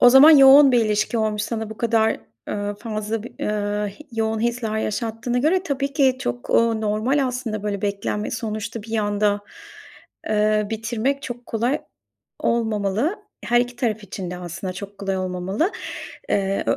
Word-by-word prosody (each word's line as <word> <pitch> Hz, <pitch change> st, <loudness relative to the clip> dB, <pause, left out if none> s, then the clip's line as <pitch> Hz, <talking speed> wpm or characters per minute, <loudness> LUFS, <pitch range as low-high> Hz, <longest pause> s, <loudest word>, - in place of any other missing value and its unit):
O 245 Hz, -, +8 dB
zaman 265 Hz, +5 st, +9 dB
yoğun 275 Hz, -1 st, +8 dB
bir 235 Hz, -2 st, +4 dB
ilişki 215 Hz, +2 st, 0 dB
olmuş 215 Hz, -1 st, 0 dB
sana 220 Hz, -1 st, -3 dB
bu 220 Hz, -, -8 dB
kadar, 225 Hz, -, +1 dB, 0.3 s
eee, 205 Hz, 0 st, -2 dB
fazla, 215 Hz, -1 st, -3 dB
b 240 Hz, -, -7 dB
iii, 210 Hz, +2 st, -3 dB
yoğun 220 Hz, -1 st, -1 dB
hisler 230 Hz, -2 st, -1 dB
yaşattığına 225 Hz, +3 st, -2 dB
göre. 335 Hz, +8 st, +2 dB
Tabii 280 Hz, -4 st, -2 dB
ki 265 Hz, -3 st, +3 dB
çok, 120 Hz, 0 st, -4 dB
ooo, 230 Hz, -1 st, +3 dB
normal 225 Hz, +7 st, +1 dB
aslında 240 Hz, -4 st, -3 dB
böyle 200 Hz, -2 st, -3 dB
beklenme 205 Hz, +1 st, -2 dB
sonuçta 220 Hz, 0 st, -4 dB
bir 220 Hz, +1 st, -3 dB
anda, 205 Hz, 0 st, +1 dB, 0.9 s
eee, 215 Hz, 0 st, +2 dB
bitirmek 235 Hz, +5 st, -1 dB
çok 245 Hz, -1 st, -7 dB
kolay 240 Hz, +6 st, 0 dB, 0.6 s
olmamalı. 225 Hz, -, 0 dB, 0.3 s
Her 240 Hz, 0 st, +4 dB
iki 245 Hz, 0 st, -3 dB
taraf 220 Hz, -4 st, -1 dB
için 185 Hz, -2 st, -6 dB
de 180 Hz, -, -5 dB
aslında 180 Hz, +1 st, -5 dB
çok 200 Hz, +2 st, -9 dB
kolay 195 Hz, -1 st, -2 dB
olmamalı. 185 Hz, -, -1 dB, 0.6 s
Eee, 195 Hz, 0 st, +1 dB
ö -, -, +2 dB
220 Hz, 160 wpm, -22 LUFS, 205-245 Hz, 0.9 s, zaman